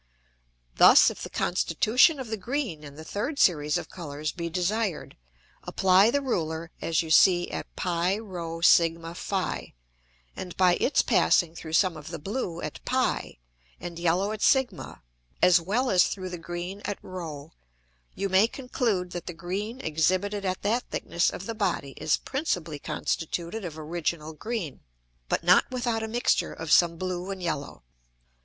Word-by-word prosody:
Thus - - +8
if - - -10
the - - -6
constitution 220 - +2
of 255 -4 -6
the 220 - -1
green 225 - -3
in 145 -1 -10
the 155 - -9
third 210 - -3
Series 150 - +3
of - - -7
Colours 150 -3 -5
be 170 -1 -5
desired, 185 +2 -2 0.5
apply 190 +3 +4
the 285 +3 0
Ruler 165 -8 -2
as 165 +1 +1
you 160 - -6
see 175 +1 +5
at - - -5
[Greek: - - -5
prsph], 170 -1 0 0.6
and 180 -2 -7
by 185 -1 +5
its 280 - +2
passing 170 -3 +3
through 160 -1 -8
some 180 +1 +3
of 155 -1 -10
the 165 +1 -5
blue 180 - -4
at - - -6
[Greek: - - +1
p] - - -15 0.4
and 170 0 -7
yellow 175 +4 +1
at 215 -1 -5
[Greek: 265 -6 +1
s], 135 -7 -9 0.4
as 180 -1 +5
well 240 +9 0
as 180 -1 +5
through 185 -2 -5
the 175 - -6
green 175 +4 -6
at 205 - -4
[Greek: 185 - -11
r], 150 -2 -8 0.6
you 200 - -1
may 190 +3 +4
conclude 230 -8 -2
that 175 -2 -6
the 175 - -4
green 200 +8 -4
exhibited 185 +6 0
at 185 0 -2
that 230 +5 0
thickness 170 - 0
of 190 - -7
the 230 - -3
Body 185 -10 -2
is 155 0 +1
principally 175 - -3
constituted 170 +8 -3
of 165 -3 -6
original 160 0 -3
green, 190 - -5 0.5
but - - 0
not 180 +2 +5
without 240 -3 -1
a 220 - -3
mixture 240 +2 +1
of 165 -1 -6
some 170 -1 +5
blue 185 +1 -4
and 190 -2 -5
yellow. 145 - -4
180 Hz, 165 wpm, -27 LUFS, 165-205 Hz, 0.6 s, Thus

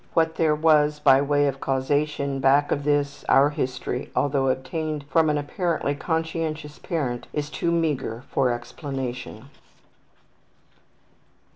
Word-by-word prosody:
What 160 -1 +3
there 155 -2 +2
was 150 -1 +3
by 135 -2 +5
way 145 0 +2
of 135 -1 -1
causation 140 +1 -1
back 140 +2 +3
of 145 - -1
this, 145 -1 0
our 140 +2 +5
history, 125 -2 -3
although 140 -1 +1
obtained 145 +4 -2
from 160 +2 +4
an 150 - +1
apparently 150 0 -1
conscientious 160 -1 -3
parent, 135 -8 -3
is 150 0 -3
too 170 - -1
meagre 145 -8 -1
for 130 -2 +2
explanation. 125 -1 -6
145 Hz, 125 wpm, -24 LUFS, 135-155 Hz, -, by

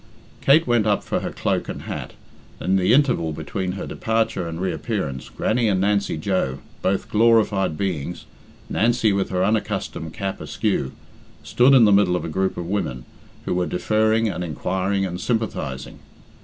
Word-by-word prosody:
Kate 155 +4 +5
went 120 -3 +2
up 105 - +2
for - - -1
her - - -4
cloak - - -2
and - - -6
hat, - - -6 0.5
and - - -2
in - - +4
the 95 - +3
interval 125 - +3
between 90 +4 -3
her 95 - -5
departure 110 -5 -1
and 80 0 -5
reappearance, 90 - -3
Grannie 115 +1 0
and 95 -3 +2
Nancy 100 -2 +1
Joe, 75 -6 -1 0.2
both 95 0 0
glorified 110 -6 +3
beings, 90 -3 -3 0.4
Nancy 115 -1 +2
with 100 -1 0
her 90 -1 0
unaccustomed 105 -6 -2
cap 95 +3 -4
askew, 65 - -1 0.5
stood 130 +3 +4
in 120 -4 +7
the 105 - +5
middle 100 -3 +4
of 90 - -2
a - - -4
group 95 +3 -1
of 85 - -4
women, 85 -10 -3 0.4
who - - -1
were 90 0 0
deferring, 110 +4 +1
and 90 -4 -3
inquiring, 95 +4 -1
and 90 -1 -5
sympathising. 115 -1 -3
95 Hz, 170 wpm, -22 LUFS, 90-110 Hz, 0.5 s, in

